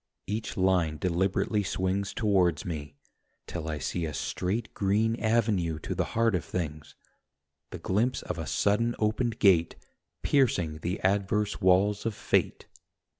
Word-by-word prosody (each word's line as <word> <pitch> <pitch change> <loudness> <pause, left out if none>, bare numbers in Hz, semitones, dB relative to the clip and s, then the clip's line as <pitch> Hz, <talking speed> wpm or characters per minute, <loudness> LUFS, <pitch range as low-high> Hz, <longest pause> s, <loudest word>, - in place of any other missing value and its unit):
Each 110 +2 -4
line 90 -5 +2
deliberately 95 +5 0
swings 95 +1 -1
Towards 90 -8 +1
me, 75 -4 -5 0.5
till 80 -2 -5
I 80 - -2
see 85 +3 -2
a 75 - -5
straight 105 +6 -2
Green 105 +3 +1
avenue 105 -8 +1
to - - -4
the - - 0
heart 115 -1 +3
of 90 - 0
things, 75 -4 -5 0.7
The - - -6
glimpse 115 +7 0
of 90 -2 -4
a 80 - -4
sudden 115 +4 +1
opened 110 +2 0
gate 90 -5 +4 0.5
Piercing 90 - +2
the 90 +4 -3
adverse 100 +2 0
walls 100 +4 +3
of 110 - -3
fate - - 0
95 Hz, 140 wpm, -28 LUFS, 85-105 Hz, 0.7 s, gate